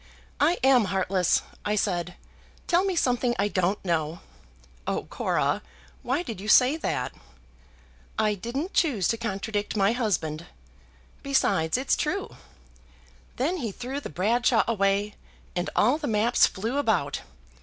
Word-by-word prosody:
'I 325 +5 +3
am 260 -4 +5
heartless,' 190 -1 +1 0.2
I 210 0 0
said. 180 -4 -1 0.5
'Tell 355 +1 +3
me 385 -2 0
something 245 -5 +1
I 200 - +2
don't 190 +1 0
know.'" 165 -1 -1 0.7
"Oh, - - -1
Cora, - - 0 0.4
why 260 +8 -1
did 225 - -6
you 210 - -7
say 255 +6 +6
that?" 320 - -2 1.0
"I 215 -1 +2
didn't 250 - -4
choose 245 - +2
to 230 - +1
contradict 210 -2 -3
my 200 +1 +4
husband. 175 -9 -1 0.7
Besides, 250 - +1
it's 260 +1 +1
true. - - -2 1.0
Then 310 +9 0
he 235 - -3
threw 255 +7 -5
the - - -7
Bradshaw 225 - +2
away, 200 -1 +1 0.4
and 175 0 -1
all 250 +8 +3
the 295 - -3
maps 225 +2 +4
flew 225 +8 -3
about. 185 - 0
220 Hz, 135 wpm, -26 LUFS, 190-255 Hz, 1.0 s, say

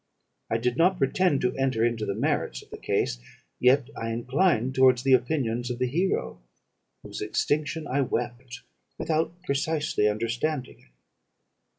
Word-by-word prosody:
I 115 - +1
did 120 +2 -1
not 180 +3 +4
pretend 145 +2 +2
to 125 0 0
enter 130 -4 +1
into 115 -2 -1
the 100 - -1
merits 125 - -1
of - - -24
the - - -7
case, - - -1 0.4
yet 125 +1 +4
I 115 - -4
inclined 125 +2 +1
towards 130 -2 +4
the 135 -1 +4
opinions 125 -2 +1
of 120 - -3
the 125 - 0
hero, 170 - -1 0.6
whose - - -7
extinction 150 +1 -1
I 140 +1 0
wept, 120 -1 -3 0.4
without 160 0 0
precisely 145 -7 0
understanding 120 +6 -2
it. - - -25
130 Hz, 150 wpm, -26 LUFS, 120-145 Hz, 0.6 s, not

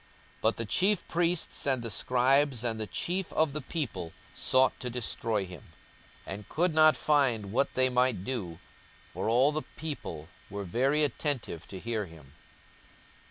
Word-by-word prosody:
But 110 - +2
the 115 - -2
chief 190 - +2
priests 170 -3 0
and 130 -3 +1
the 115 - -1
scribes 130 +2 +2
and 115 -2 -1
the 110 - -3
chief 180 - -2
of 155 -3 +2
the 150 - -3
people 120 - -4 0.2
sought 130 0 +3
to 125 - -4
destroy 115 -3 -1
him, 90 -5 -10 0.6
42:019:048 - - -5
And 100 +1 -9
could 170 +2 +1
not 155 0 +6
find 125 -9 +2
what 135 +5 +1
they 130 0 +5
might 125 -6 +1
do: 100 -9 -3 0.5
for - - -3
all 130 +5 +4
the 155 +1 -1 0.2
people 140 - -5 0.2
were 100 +1 -5
very 135 - +2
attentive 130 - -2
to 95 - -8
hear 110 -1 -3
him. 75 -5 -15
125 Hz, 160 wpm, -29 LUFS, 105-150 Hz, 0.6 s, not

